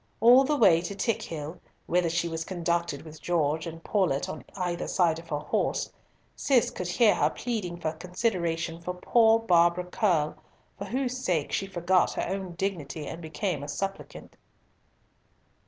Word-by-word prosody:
All 245 +4 +7
the 295 +2 +1
way 180 -9 +6
to 190 +3 -5
Tickhill, 165 -7 -3 0.2
whither 175 -1 +1
she 170 +1 0
was 165 -1 -3
conducted 170 -4 -2
with 155 -1 -12
Gorges 160 -1 0
and 165 +1 -13
Paulett 180 -10 +1
on 155 - -6
either 175 -2 -2
side 165 -3 +2
of 165 0 -14
her 150 - -1
horse, - - -1 0.4
Cis 260 -5 +2
could 180 - -5
hear 210 +4 +4
her - - +2
pleading 210 -8 -4
for 160 -2 -1
consideration 170 -2 -2
for 180 +1 -4
poor 225 +4 +4
Barbara 175 -5 +3
Curll, 175 -5 +1 0.4
for - - -4
whose 255 -1 -2
sake 160 -5 0
she 195 - -1
forgot 185 0 +2
her - - -2
own 190 -2 -4
dignity 165 -5 -3
and 165 - -7
became 160 0 -3
a 145 - -6
suppliant. 195 +6 -6
175 Hz, 160 wpm, -28 LUFS, 165-195 Hz, 0.4 s, All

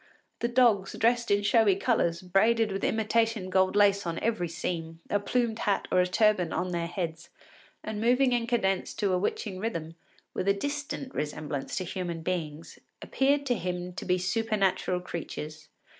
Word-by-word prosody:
The 235 - 0
dogs, 235 -6 +3
dressed 235 +1 +2
in 205 0 +3
showy 215 -2 +4
colours, 185 -6 0
braided 215 +4 +3
with 195 - -4
imitation 220 -3 +1
gold 190 +1 +3
lace 200 -2 +4
on 165 0 -2
every 220 -6 -1
seam, 165 0 -4
a 205 - +3
plumed 230 +1 0
hat 200 - 0
or - - +4
a 180 - +1
turban 185 -3 +2
on 180 0 -2
their 170 -1 -1
heads, 165 -2 -5 0.5
and 215 -1 -4
moving 250 +3 +3
in 240 -1 0
cadence 195 -6 0
to 200 -2 0
a 180 - +2
witching 190 0 -2
rhythm, 170 -7 -3 0.4
with 185 - -3
a 200 - +4
distant 285 +3 -4
resemblance 150 -2 -4
to 185 - -1
human 175 -2 -4
beings, 165 -3 -4 0.2
appeared 280 +1 +1
to 255 - +2
him 180 -3 -4
to 185 - -6
be 180 0 +1
supernatural 195 -2 0
creatures. 155 -3 -7
195 Hz, 170 wpm, -28 LUFS, 175-225 Hz, 0.5 s, showy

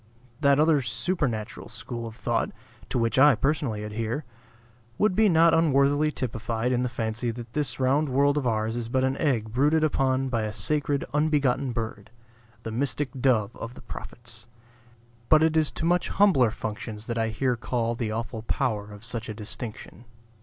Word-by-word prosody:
That 140 -1 +4
other 155 -2 +4
supernatural 120 - -2
school 115 +1 -6
of 110 - -9
thought - - -1 0.4
(to - - -1
which 115 +2 +1
I 145 -1 +7
personally 135 -6 -1
adhere) 110 +6 -3 0.7
would 210 -3 +2
be 220 0 +5
not 165 -1 +5
unworthily 145 -1 +3
typified 115 -2 -2
in 125 -1 +1
the 125 - 0
fancy 115 0 -2
that 115 0 -7
this 140 -6 -1
round 135 +3 +2
world 140 +2 +3
of 145 -4 0
ours 110 0 0
is 120 -1 -4
but 130 +1 +1
an 130 0 +1
egg 115 -8 0
brooded 150 +5 +3
upon 135 -3 +1
by 115 -3 0
a 105 -1 -3
sacred 140 +6 0
unbegotten 145 -4 +1
bird; 110 -3 -5 0.5
the 110 - -4
mystic 140 +3 -1
dove 115 -6 +2
of 115 +2 -7
the - - -12
prophets. 120 -2 -8 0.8
But 155 0 +6
it 160 0 +2
is 155 -2 +3
to - - -3
much 175 +1 +2
humbler 175 - +4
functions 110 0 -6
that 115 -1 -2
I 115 - +1
here 125 +3 0
call 115 0 -1
the 115 -2 -3
awful 115 0 -4
power 110 -4 -1
of 105 +1 -11
such 115 -1 -2
a 110 - -5
distinction. 110 +2 -7
125 Hz, 175 wpm, -26 LUFS, 115-145 Hz, 0.8 s, I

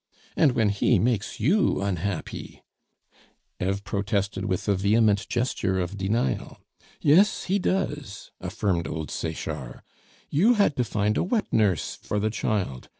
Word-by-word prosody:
And 145 -5 +4
when 110 -3 +2
he 100 0 +2
makes 115 -3 0
you 175 - +2
unhappy 100 -2 -4 0.5
" - - -25
Eve 100 +2 -1
protested 100 -1 -1
with 95 0 -2
a 100 - +4
vehement 100 +2 +2
gesture 120 -6 0
of 90 +2 -3
denial. 95 - -1 0.4
"Yes, 175 +8 +4
he 195 +2 0
does," 150 - -2
affirmed 90 -2 -1
old 80 -1 -5
Sechard; - - -5 0.5
"you 210 +12 +4
had 200 -9 +3
to 125 - +2
find 105 -2 0
a - - +2
wet 215 +4 -1
nurse 100 -8 +1
for 105 - -3
the 110 +1 0
child. 100 - -2
105 Hz, 145 wpm, -26 LUFS, 95-125 Hz, 0.5 s, And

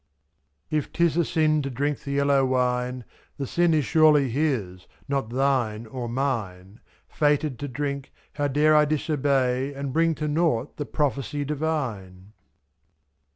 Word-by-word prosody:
49 155 - +2
If 145 - -8
'tis 170 -2 +2
a 170 - +3
sin 155 -1 +1
to 140 - -3
drink 140 +3 -2
the 140 - -5
yellow 140 -1 +3
wine. 125 -1 0 0.3
The 140 - -3
sin 175 +5 +2
is 150 -3 +1
surely 150 -5 +4
His, 115 -11 -2 0.2
not 135 -5 -1
thine 120 -4 0
or 120 +1 -6
mine; 110 -6 -3 0.3
7f* - - -28
Fated 145 -2 +1
to 145 - -4
drink, 140 +1 -4 0.2
how 145 -1 -1
dare 150 +3 +3
I 150 0 +6
disobey 140 -3 0
— - - -15
And 140 -1 -4
bring 165 +1 +2
to 150 0 -3
nought 150 -5 0
the 145 - -4
prophecy 145 0 -2
divine 120 -11 -4
140 Hz, 155 wpm, -25 LUFS, 125-150 Hz, 0.3 s, I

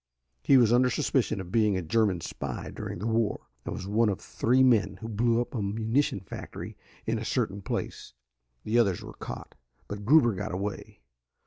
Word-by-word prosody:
He 135 - +5
was 120 -2 +5
under 125 +1 +5
suspicion 110 - 0
of 90 -2 -7
being 105 -3 +3
a 90 - -2
German 95 0 +1
spy - - -5
during - - -6
the 100 - -5
war, 115 -1 0 0.2
and - - -4
was - - -6
one 105 +3 +2
of 100 - -2
three 130 +3 +2
men 105 -7 +3
who 115 - -6
blew 115 +2 +2
up 120 - -3
a 115 - -2
munition 110 +3 0
factory 95 - -8 0.3
in - - 0
a - - -4
certain 100 +1 -1
place. - - -5 0.5
The 115 +3 +2
others 100 -7 +2
were - - -9
caught, - - -8 0.3
but 105 0 -6
Gruber 120 -1 +5
got 95 0 -4
away. 100 +2 -5
110 Hz, 190 wpm, -28 LUFS, 100-120 Hz, 0.5 s, He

